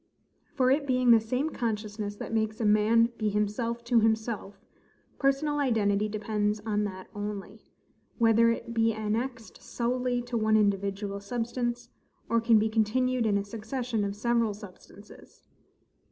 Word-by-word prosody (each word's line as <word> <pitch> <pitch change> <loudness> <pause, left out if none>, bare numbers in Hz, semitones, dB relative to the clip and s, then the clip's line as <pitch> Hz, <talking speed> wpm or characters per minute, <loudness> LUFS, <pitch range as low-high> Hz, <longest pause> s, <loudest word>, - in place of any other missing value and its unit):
For, 255 -2 +3
it 280 +1 +1
being 255 -2 +3
the 230 - +8
same 250 +8 -2
consciousness 210 -3 -3
that 215 - -7
makes 220 -1 -1
a 225 - 0
man 220 +3 +4
be 215 -1 +1
himself 210 +3 -1
to 235 0 +3
himself, 220 -2 -1 0.6
personal 290 +2 +1
identity 215 -6 +1
depends 210 0 -1
on 210 -1 -1
that 185 -2 -6
only, 205 0 -6 0.5
whether 230 0 +4
it 230 0 -3
be 225 0 +2
annexed 220 +1 -4
solely 245 0 -1
to 240 0 -6
one 215 0 +3
individual 200 -1 0
substance, 240 +3 -3 0.4
or 230 0 +2
can 230 -1 +5
be 215 +1 +2
continued 230 +3 +1
in 205 -1 +2
a 200 - -1
succession 225 +1 -3
of 200 0 -3
several 230 -1 +1
substances. 205 0 -15
225 Hz, 145 wpm, -28 LUFS, 210-240 Hz, 0.6 s, the